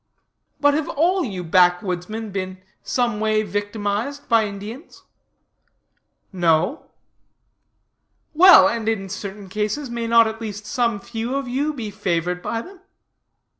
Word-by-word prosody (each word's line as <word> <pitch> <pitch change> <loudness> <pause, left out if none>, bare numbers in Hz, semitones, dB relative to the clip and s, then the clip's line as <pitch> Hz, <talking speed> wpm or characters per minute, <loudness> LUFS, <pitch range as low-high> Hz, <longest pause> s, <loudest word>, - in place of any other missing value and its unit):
But, 290 0 +4
have 305 +1 -1
all 355 +5 +1
you 190 -7 -4
backwoodsmen 180 +4 +1
been 185 -1 -4 0.2
some 240 -4 -1
way 215 0 +1
victimized 205 +6 -3
by 225 -2 +3
Indians? 210 - -9 1.3
No. 175 - +1 1.5
Well, 365 +3 +8
and 225 -2 -1
in 195 -3 -2
certain 200 0 -7
cases 215 +7 -3
may 235 -1 -3
not 230 0 +6
at 220 +1 -5
least 210 -1 -6
some 235 -5 0
few 235 +2 -4
of 275 -2 -2
you 275 +5 -1
be 235 -8 -6
favored 180 -3 -2
by 230 +4 -3
them? 380 0 -14
220 Hz, 130 wpm, -22 LUFS, 195-245 Hz, 1.5 s, Well